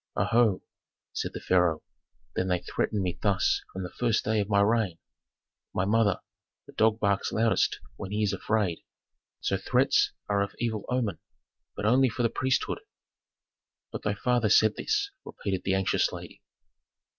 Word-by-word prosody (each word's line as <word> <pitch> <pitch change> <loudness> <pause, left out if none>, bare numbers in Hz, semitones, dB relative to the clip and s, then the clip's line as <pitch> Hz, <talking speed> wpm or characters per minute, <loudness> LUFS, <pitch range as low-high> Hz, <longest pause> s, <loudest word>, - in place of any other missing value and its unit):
'" - - -55
"Oho!" 115 -4 +2 0.5
said - - -3
the - - -3
pharaoh, 90 -4 +2 0.5
"then 95 - 0
they 90 -1 +2
threaten 100 +2 -1
me 90 -2 -3
thus 100 -2 +2
from 95 - -5
the 90 - -6
first 115 -2 0
day 110 0 +1
of 100 0 -1
my 100 -1 +3
reign. 105 -4 +2 0.8
My 95 - +1
mother, 105 -2 +2 0.5
a - - -12
dog 110 0 +2
barks 100 -2 +1
loudest 110 -3 +2 0.2
when 95 - -6
he 105 +1 -1
is 100 -2 +1
afraid; 100 -3 0 0.6
so - - 0
threats - - +2 0.2
are 100 -1 +1
of 100 0 -3
evil 110 -3 -2
omen, 115 -8 -1 0.6
but 105 - -4
only 130 +4 +4
for 120 +2 -2
the 115 - +3
priesthood." 130 +1 0 1.1
"But - - -5
thy 105 0 -1
father 120 0 +1
said 110 +1 +5
this," - - -1
repeated 95 -2 -4
the 95 - +2
anxious 95 -1 +1
lady. - - -9
105 Hz, 165 wpm, -28 LUFS, 95-115 Hz, 1.1 s, said